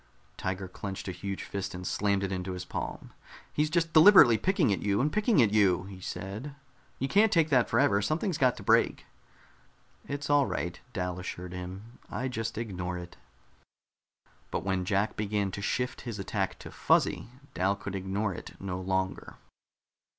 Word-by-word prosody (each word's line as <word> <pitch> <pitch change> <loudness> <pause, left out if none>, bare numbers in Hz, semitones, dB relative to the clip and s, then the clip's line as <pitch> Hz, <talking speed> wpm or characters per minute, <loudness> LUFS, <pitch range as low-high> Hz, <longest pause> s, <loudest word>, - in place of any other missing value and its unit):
Tiger 95 +4 -3
clenched 95 +2 -6
a - - -2
huge 95 +2 -5
fist 100 -2 -5
and 90 0 -7
slammed 100 +1 +1
it 100 - -2
into 95 0 -3
his 90 0 -6
palm. - - -6 0.4
"He's 150 +1 +1
just 165 0 0
deliberately 160 - +9
picking 175 - +2
at - - -3
you 100 -1 +1
and 150 +4 +1
picking 215 - +4
at 105 - +2
you," 95 -4 +4
he 95 -1 -10
said. 105 +10 -6 0.4
"You 135 - -1
can't 205 +6 +4
take 165 -5 +3
that 125 -3 +4
forever. 115 -4 +3
Something's 155 - -1
got 130 -2 +3
to - - -8
break." - - +3 1.0
"It's 145 +1 -4
all 145 -2 +4
right," 85 0 -3
Dal 90 -2 -3
assured 90 0 -6
him. 95 +6 -8
"I 130 +1 -3
just 110 -3 -4
ignore 90 -6 -3
it." 90 0 -9 1.3
But - - -3
when 95 -1 -1
Jack 100 +2 0
began 105 -2 -1
to 100 - -5
shift 125 +5 -2
his 115 -4 -5
attack 95 - -2
to - - -10
Fuzzy, 115 - +1 0.2
Dal 95 +2 +1
could 100 -1 -7
ignore 95 +2 -2
it - - -10
no 95 -2 -4
longer. 95 0 -2
100 Hz, 170 wpm, -29 LUFS, 95-130 Hz, 1.3 s, deliberately